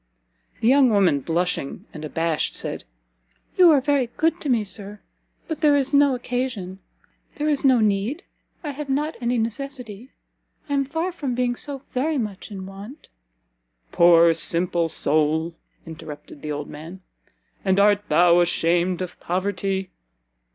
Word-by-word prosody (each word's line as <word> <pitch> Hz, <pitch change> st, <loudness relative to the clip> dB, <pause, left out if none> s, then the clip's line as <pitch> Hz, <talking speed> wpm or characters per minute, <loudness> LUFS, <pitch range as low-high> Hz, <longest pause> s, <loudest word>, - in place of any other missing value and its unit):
The 225 Hz, -, +2 dB
young 265 Hz, 0 st, +6 dB
woman, 195 Hz, -9 st, +3 dB
blushing 165 Hz, -1 st, -2 dB
and 155 Hz, -, -8 dB
abashed, 165 Hz, +1 st, -1 dB
said, -, -, -5 dB, 0.7 s
"You 360 Hz, -2 st, +7 dB
are 300 Hz, -3 st, +6 dB
very 275 Hz, -2 st, +1 dB
good 325 Hz, +2 st, +1 dB
to 295 Hz, -, -3 dB
me, 235 Hz, -4 st, +2 dB
Sir, 200 Hz, +1 st, -7 dB, 0.5 s
but 320 Hz, -3 st, -5 dB
there 295 Hz, -2 st, +5 dB
is 275 Hz, 0 st, 0 dB
no 280 Hz, -2 st, +5 dB
occasion 245 Hz, -7 st, -4 dB, 0.6 s
there 300 Hz, -, -2 dB
is 295 Hz, -2 st, +1 dB
no 260 Hz, -3 st, +5 dB
need 215 Hz, -, 0 dB, 0.4 s
I 295 Hz, -, -3 dB
have 285 Hz, 0 st, -7 dB
not 300 Hz, +4 st, -1 dB
any 240 Hz, +1 st, 0 dB
necessity 240 Hz, -1 st, -4 dB, 0.6 s
I 285 Hz, -, -3 dB
am 275 Hz, -1 st, +1 dB
far 325 Hz, +6 st, -2 dB
from 280 Hz, -8 st, -4 dB
being 245 Hz, 0 st, 0 dB
so 275 Hz, +1 st, -5 dB
very 295 Hz, +4 st, 0 dB
much 210 Hz, -6 st, -4 dB
in 190 Hz, -3 st, -7 dB
want 200 Hz, +9 st, -11 dB, 0.4 s
" -, -, -47 dB
"Poor, 170 Hz, -1 st, +6 dB
simple 170 Hz, 0 st, 0 dB
soul!" 155 Hz, +2 st, 0 dB, 0.3 s
interrupted 155 Hz, -3 st, -10 dB
the 150 Hz, -, -5 dB
old 145 Hz, 0 st, -4 dB
man, 165 Hz, +5 st, -10 dB, 0.6 s
"and 190 Hz, 0 st, +2 dB
art 205 Hz, 0 st, +3 dB
thou 170 Hz, +2 st, +5 dB
ashamed 175 Hz, +1 st, +1 dB
of 180 Hz, -, -9 dB
poverty? 190 Hz, +1 st, -2 dB
205 Hz, 150 wpm, -23 LUFS, 170-275 Hz, 0.7 s, You